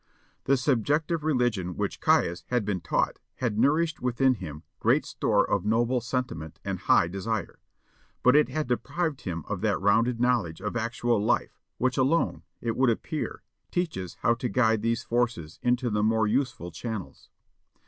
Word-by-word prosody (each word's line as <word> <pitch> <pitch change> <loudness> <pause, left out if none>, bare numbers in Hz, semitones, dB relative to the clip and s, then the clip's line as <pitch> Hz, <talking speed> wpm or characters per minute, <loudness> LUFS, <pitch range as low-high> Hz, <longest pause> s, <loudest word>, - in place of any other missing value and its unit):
The 135 0 +4
subjective 150 +5 +1
religion 120 - 0
which - - -2
Caius 85 +1 +2
had 125 -4 0
been 100 -4 -1
taught - - 0 0.2
had 115 -4 -1
nourished 155 +6 +2
within 125 +1 +2
him 80 - -8 0.2
great - - +3
store - - +1
of - - 0
noble 120 +4 +1
sentiment 115 - -4
and - - -2
high - - +4
desire, 100 +3 -3 0.6
but 125 +2 +6
it 150 - +5
had 155 -1 -2
deprived 140 +6 -1
him 85 -4 -4
of - - -3
that - - +1
rounded 115 +4 +2
knowledge 120 -10 +1
of 105 - -4
actual 115 -1 0
life - - 0 0.2
which 130 0 0
alone, 135 +6 +2 0.2
it 115 -1 -1
would 130 -1 +3
appear, 145 +6 -3 0.3
teaches 155 - -3
how 115 - +4
to 120 +1 -3
guide 110 -4 +2
these 115 +1 0
forces 115 -11 -1
into 125 0 +1
the 105 0 +1
more 110 +1 +3
useful 110 -6 -1
channels. 105 +3 -6
120 Hz, 160 wpm, -27 LUFS, 105-130 Hz, 0.6 s, but